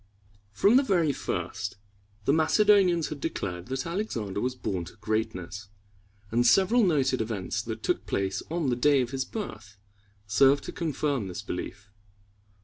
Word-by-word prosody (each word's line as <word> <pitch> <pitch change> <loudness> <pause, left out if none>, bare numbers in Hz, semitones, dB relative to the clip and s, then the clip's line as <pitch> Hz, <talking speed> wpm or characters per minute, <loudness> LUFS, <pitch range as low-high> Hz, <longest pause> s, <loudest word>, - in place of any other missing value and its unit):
From 200 - +4
the - - +6
very 170 - +2
first, 100 -5 -4 0.5
the 140 - +3
Macedonians 180 0 +4
had 150 -2 -7
declared 90 - -4
that 130 +1 -3
Alexander 125 - -3
was 125 +1 -1
born 95 -7 -3
to 90 - -12
greatness, 105 -3 -3 0.6
and 120 +2 +3
several 195 - +5
noted 135 - +2
events 105 -4 -2
that - - -6
took - - -1
place 95 -1 -1
on 160 -5 0
the - - +1
day 140 +2 +4
of 120 -1 -3
his 135 -1 -2
birth 105 - -7 0.5
served 135 +8 +4
to - - -6
confirm 145 - -1
this 90 +1 -6
belief. 105 +2 -6
130 Hz, 150 wpm, -27 LUFS, 105-165 Hz, 0.6 s, the